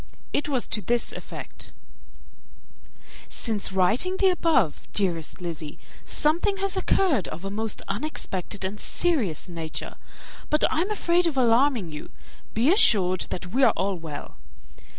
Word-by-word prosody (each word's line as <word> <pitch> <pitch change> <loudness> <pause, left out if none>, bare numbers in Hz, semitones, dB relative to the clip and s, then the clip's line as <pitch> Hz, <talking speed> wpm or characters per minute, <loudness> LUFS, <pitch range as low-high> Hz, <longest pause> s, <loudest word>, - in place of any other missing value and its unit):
It 295 - 0
was 260 -4 0
to 215 - +1
this 235 +5 0
effect: - - -8 1.6
"Since 215 -5 0
writing 215 - +2
the 385 -1 +4
above, 315 - +1
dearest 175 -4 -1
Lizzy, 160 -4 -5 0.3
something 345 +7 +1
has 390 -1 -1
occurred 360 - +2
of 170 +5 -7
a 195 - -3
most 220 +1 -2
unexpected 195 - -3
and 200 +3 -4
serious 245 - 0
nature; 165 -3 -6 0.5
but 300 - +2
I 320 - +1
am 375 - -1
afraid 355 -4 +2
of 305 -5 -2
alarming 240 - +3
you 150 - -8 0.5
be 250 +10 +4
assured 185 - +4
that 180 +1 -5
we 265 - +2
are 260 - +6
all 195 +1 0
well. 160 -4 -8
225 Hz, 140 wpm, -25 LUFS, -, 1.6 s, are